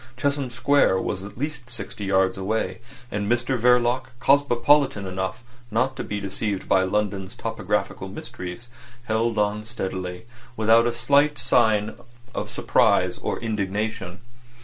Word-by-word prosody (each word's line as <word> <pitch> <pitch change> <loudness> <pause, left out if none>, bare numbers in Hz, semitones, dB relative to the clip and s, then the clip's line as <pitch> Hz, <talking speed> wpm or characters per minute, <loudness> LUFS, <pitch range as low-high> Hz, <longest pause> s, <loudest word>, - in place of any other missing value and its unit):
Chesham 140 0 0
Square 120 -4 +3
was 95 -1 -3
at 100 - -10
least 145 -2 -4
sixty 115 -3 -5
yards 95 -1 +2
away, 95 -1 -2 0.3
and 105 +1 -1
Mr 120 +2 +1
Verloc, 125 +1 +3
cosmopolitan 140 -3 +3
enough 95 +5 -4 0.3
not 130 +4 +1
to - - -4
be 105 - -3
deceived 100 0 -3
by 95 - +4
London's 95 0 -1
topographical - - -2
mysteries, 90 +7 -8 0.4
held 115 -1 0
on 105 0 +1
steadily, 95 -4 -5 0.3
without 115 +2 +5
a 140 +5 +3
sign 110 -4 +2 0.4
of - - -3
surprise - - +2
or - - -3
indignation. 105 -2 -3
110 Hz, 125 wpm, -24 LUFS, 100-125 Hz, 0.4 s, without